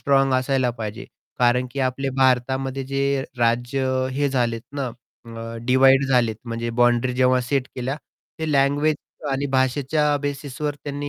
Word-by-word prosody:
Strong 135 Hz, -1 st, +3 dB
असायला 130 Hz, -1 st, +1 dB
पाहिजे. 110 Hz, +2 st, -5 dB, 0.3 s
कारण 125 Hz, +1 st, +3 dB
की 140 Hz, -, -3 dB
आपले 135 Hz, +2 st, -3 dB
भारतामध्ये 130 Hz, +1 st, +1 dB
जे 140 Hz, 0 st, +1 dB
राज्य 120 Hz, +3 st, +1 dB
अ, 130 Hz, 0 st, 0 dB
हे 140 Hz, +1 st, +1 dB
झालेत 120 Hz, -3 st, 0 dB, 0.2 s
ना 135 Hz, -, -1 dB, 0.4 s
अ, 115 Hz, 0 st, -7 dB
डिव्हाईड 135 Hz, +1 st, +5 dB
झालेत 120 Hz, -4 st, +2 dB
म्हणजे 115 Hz, 0 st, -3 dB
बाउंडरी 120 Hz, +1 st, +3 dB
जेव्हा 130 Hz, 0 st, +4 dB
सेट 130 Hz, +1 st, -1 dB
केल्या. 130 Hz, +3 st, -3 dB, 0.4 s
ते 160 Hz, -1 st, -2 dB
लँग्वेज 145 Hz, +2 st, +2 dB, 0.3 s
आणि 135 Hz, +1 st, -1 dB
भाषेच्या 145 Hz, +3 st, +2 dB
बेसिसवर 145 Hz, +1 st, -3 dB
त्यांनी 145 Hz, 0 st, -4 dB
130 Hz, 145 wpm, -23 LUFS, 125-140 Hz, 0.4 s, डिव्हाईड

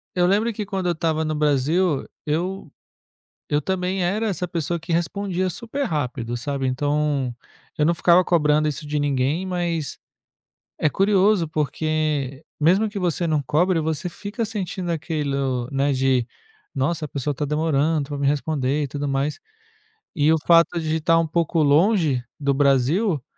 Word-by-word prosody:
eu 180 Hz, -1 st, +3 dB
lembro 210 Hz, +5 st, +2 dB
que 210 Hz, -1 st, -4 dB
quando 195 Hz, -2 st, -3 dB
eu -, -, +3 dB
estava 160 Hz, -1 st, 0 dB
no 155 Hz, 0 st, -1 dB
Brasil, 150 Hz, +2 st, +1 dB, 0.2 s
eu 175 Hz, +4 st, -2 dB, 0.8 s
eu 145 Hz, 0 st, +1 dB
também 185 Hz, +1 st, -1 dB
era 210 Hz, +5 st, 0 dB
essa 185 Hz, -2 st, -2 dB
pessoa 170 Hz, -1 st, -2 dB
que 165 Hz, +1 st, -5 dB
respondia 185 Hz, +2 st, -1 dB
super 235 Hz, -, -4 dB
rápido, 125 Hz, -, -2 dB
sabe, 135 Hz, +2 st, -2 dB
então 145 Hz, -1 st, 0 dB, 0.4 s
eu 150 Hz, -, +3 dB
não 170 Hz, -, +3 dB
ficava 175 Hz, +2 st, +5 dB
cobrando 155 Hz, -3 st, +2 dB
isso 150 Hz, +1 st, -4 dB
de 150 Hz, 0 st, -1 dB
ninguém, 145 Hz, +5 st, 0 dB
mas 175 Hz, -4 st, -2 dB, 0.8 s
é 155 Hz, -, +2 dB
curioso, 195 Hz, 0 st, +3 dB
porque 155 Hz, -2 st, -1 dB, 0.2 s
mesmo 185 Hz, +8 st, +4 dB
que 205 Hz, -1 st, -5 dB
você 175 Hz, -1 st, 0 dB
não 155 Hz, -3 st, +1 dB
cobre, 165 Hz, +5 st, +2 dB
você 160 Hz, +2 st, -2 dB
fica 205 Hz, +6 st, -5 dB
sentindo 190 Hz, -4 st, -4 dB
aquilo, 140 Hz, -6 st, -2 dB
né, 140 Hz, +1 st, +1 dB
de: 130 Hz, -2 st, +2 dB, 0.5 s
"Nossa, 150 Hz, +3 st, -1 dB
a -, -, -15 dB
pessoa 145 Hz, +1 st, -2 dB
está 145 Hz, +2 st, -3 dB
demorando 150 Hz, 0 st, 0 dB
para 145 Hz, -, -3 dB
me 140 Hz, 0 st, +1 dB
responder, 145 Hz, -1 st, 0 dB
e -, -, -4 dB
tudo 145 Hz, +1 st, -3 dB
mais". 140 Hz, +2 st, -1 dB, 0.8 s
E 155 Hz, 0 st, +4 dB
o 160 Hz, -, +3 dB
fato 170 Hz, 0 st, +5 dB
de 155 Hz, 0 st, -1 dB
estar 165 Hz, +1 st, +3 dB
um 165 Hz, -, 0 dB
pouco 165 Hz, 0 st, +1 dB
longe 155 Hz, -, +3 dB, 0.2 s
do 140 Hz, -1 st, +1 dB
Brasil, 140 Hz, -, +2 dB
155 Hz, 160 wpm, -23 LUFS, 145-180 Hz, 0.8 s, ficava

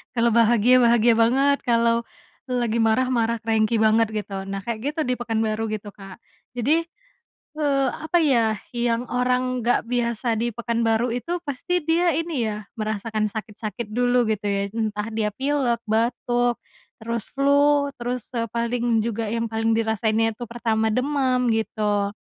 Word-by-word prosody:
kalau 235 Hz, 0 st, +3 dB
bahagia 235 Hz, +1 st, +4 dB
bahagia 235 Hz, 0 st, +5 dB
banget 275 Hz, +5 st, +3 dB
kalau, 230 Hz, 0 st, +3 dB, 0.6 s
lagi 240 Hz, -2 st, 0 dB
marah 225 Hz, +3 st, +2 dB
marah 235 Hz, -2 st, +1 dB
cranky 220 Hz, 0 st, +1 dB
banget 220 Hz, +1 st, +4 dB
gitu 200 Hz, -2 st, -4 dB
nah 195 Hz, -, -3 dB
kayak 235 Hz, -2 st, -3 dB
gitu 315 Hz, -, -7 dB
di 250 Hz, -, +1 dB
Pekanbaru 225 Hz, -2 st, -1 dB
gitu 210 Hz, -1 st, -5 dB
Kak. 195 Hz, 0 st, -12 dB, 0.3 s
Jadi, 280 Hz, +7 st, +1 dB, 0.8 s
eee, 275 Hz, -3 st, +2 dB
apa 315 Hz, +3 st, -1 dB
ya 230 Hz, -7 st, +3 dB, 0.2 s
yang 240 Hz, 0 st, 0 dB
orang 250 Hz, 0 st, 0 dB
enggak 240 Hz, +1 st, +2 dB
biasa 235 Hz, 0 st, -2 dB
di 235 Hz, -, 0 dB
Pekanbaru 235 Hz, 0 st, 0 dB
itu 335 Hz, +9 st, -3 dB
pasti 325 Hz, +5 st, -2 dB
dia 330 Hz, +1 st, +2 dB
ini 315 Hz, -8 st, -1 dB
ya 210 Hz, 0 st, -4 dB, 0.2 s
merasakan 215 Hz, 0 st, -2 dB
sakit-sakit 215 Hz, 0 st, -6 dB
dulu 245 Hz, +2 st, +2 dB
gitu 210 Hz, -1 st, -3 dB
ya 200 Hz, 0 st, 0 dB
entah 215 Hz, -1 st, -2 dB
dia 220 Hz, -1 st, -1 dB
pilek, 265 Hz, -4 st, 0 dB
batuk, 240 Hz, +2 st, 0 dB, 0.5 s
terus 230 Hz, -1 st, -3 dB
flu, 285 Hz, +1 st, +3 dB
terus 245 Hz, 0 st, -3 dB
te 230 Hz, -2 st, -2 dB
paling 235 Hz, 0 st, 0 dB
juga 225 Hz, -1 st, -2 dB
yang 230 Hz, +1 st, -2 dB
paling 225 Hz, 0 st, +1 dB
dirasainnya 225 Hz, 0 st, +1 dB
tuh 240 Hz, -, -5 dB
pertama 225 Hz, -2 st, 0 dB
demam 255 Hz, 0 st, +1 dB
gitu, 210 Hz, -2 st, -1 dB
235 Hz, 150 wpm, -23 LUFS, 220-250 Hz, 0.8 s, bahagia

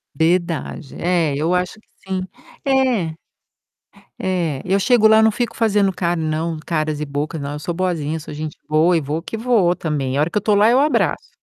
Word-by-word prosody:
Verdade, 165 Hz, -3 st, -1 dB
é, 170 Hz, -5 st, +1 dB
eu 160 Hz, +5 st, 0 dB
acho 180 Hz, 0 st, 0 dB
que -, -, -29 dB, 0.2 s
sim, 185 Hz, -1 st, -1 dB, 0.4 s
é. 250 Hz, -12 st, +1 dB, 1.0 s
É, 170 Hz, -7 st, -1 dB
eu 195 Hz, +2 st, +2 dB
chego 225 Hz, 0 st, +4 dB
lá 220 Hz, 0 st, +6 dB
não 220 Hz, -, +5 dB
fico 240 Hz, +3 st, -3 dB
fazendo 205 Hz, -4 st, +2 dB
car 175 Hz, -1 st, -1 dB
não, 160 Hz, +1 st, -2 dB
caras 155 Hz, -2 st, -1 dB
e 150 Hz, -, -2 dB
bocas, 145 Hz, +3 st, -3 dB
não 140 Hz, 0 st, -4 dB
eu 150 Hz, -, -5 dB
sou 175 Hz, -, -4 dB
boazinha, 165 Hz, -4 st, -1 dB
eu -, -, -3 dB
sou 150 Hz, -, -9 dB
gente 155 Hz, 0 st, -6 dB
boa 160 Hz, +3 st, +3 dB
e -, -, 0 dB
vou 150 Hz, +3 st, -3 dB
que 225 Hz, -, -6 dB
vou 215 Hz, -7 st, +2 dB
também, 140 Hz, -4 st, -2 dB
a 145 Hz, -, +2 dB
hora 155 Hz, -, +1 dB
que 210 Hz, -, -2 dB
eu -, -, +1 dB
tô 210 Hz, -2 st, +2 dB
lá, 210 Hz, +2 st, +5 dB
eu 255 Hz, -, +4 dB
abraço. 295 Hz, +2 st, +1 dB
170 Hz, 210 wpm, -20 LUFS, 155-200 Hz, 1.0 s, lá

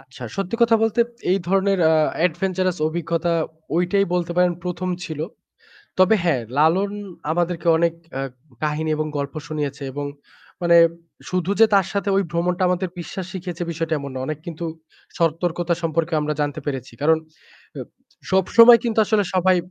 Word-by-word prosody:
আচ্ছা, 130 Hz, -1 st, -14 dB
সত্যি 195 Hz, +3 st, -2 dB
কথা 230 Hz, -1 st, +5 dB
বলতে 225 Hz, +1 st, +2 dB, 0.3 s
এই 190 Hz, -, +3 dB
ধরনের 195 Hz, +1 st, +2 dB
আ -, -, +4 dB, 0.3 s
adventurous 185 Hz, +1 st, -1 dB
অভিজ্ঞতা 170 Hz, +1 st, -1 dB, 0.4 s
ঐটাই 180 Hz, +3 st, +2 dB
বলতে 175 Hz, -1 st, -1 dB
পারেন 180 Hz, 0 st, +4 dB
১ম 180 Hz, +1 st, -3 dB, 0.2 s
ছিল। 155 Hz, -2 st, -6 dB, 0.8 s
তবে 185 Hz, +3 st, +6 dB
হ্যাঁ, 160 Hz, -8 st, +2 dB, 0.2 s
লালন 175 Hz, +6 st, +3 dB, 0.4 s
আমাদেরকে 175 Hz, +1 st, -1 dB
অনেক 170 Hz, 0 st, +2 dB, 0.2 s
অ্যা 135 Hz, -, -3 dB, 0.4 s
কাহিনী 155 Hz, +1 st, -1 dB
এবং 155 Hz, 0 st, -1 dB
গল্প 140 Hz, 0 st, -4 dB
শুনিয়েছে 145 Hz, -2 st, -4 dB
এবং 145 Hz, +1 st, -4 dB, 0.6 s
মানে 170 Hz, 0 st, +5 dB, 0.5 s
শুধু 180 Hz, 0 st, -1 dB
যে 225 Hz, -, +9 dB
তার 195 Hz, -3 st, +4 dB
সাথে 200 Hz, 0 st, -1 dB
ওই 195 Hz, -, +3 dB
ভ্রমণটা 175 Hz, +2 st, 0 dB
আমাদের 180 Hz, +1 st, 0 dB
বিশ্বাস 175 Hz, +2 st, -6 dB
শিখিয়েছে 180 Hz, -2 st, -5 dB
বিষয়টা 165 Hz, 0 st, -2 dB
এমন 140 Hz, -1 st, -6 dB
নয়। 130 Hz, 0 st, -3 dB
অনেক 155 Hz, 0 st, -3 dB
কিন্তু 170 Hz, 0 st, -6 dB, 0.5 s
সতর্কতা 170 Hz, +1 st, 0 dB
সম্পর্কেও 165 Hz, 0 st, 0 dB
আমরা 150 Hz, 0 st, -1 dB
জানতে 145 Hz, -1 st, -2 dB
পেরেছি। 135 Hz, -4 st, -4 dB
কারণ 160 Hz, +2 st, +5 dB, 0.6 s
এব -, -, -7 dB, 0.4 s
সবসময় 230 Hz, +5 st, +7 dB
কিন্তু 230 Hz, -2 st, -1 dB
আসলে 210 Hz, -1 st, +2 dB
সবাই 185 Hz, 0 st, +4 dB
175 Hz, 155 wpm, -22 LUFS, 155-185 Hz, 0.8 s, যে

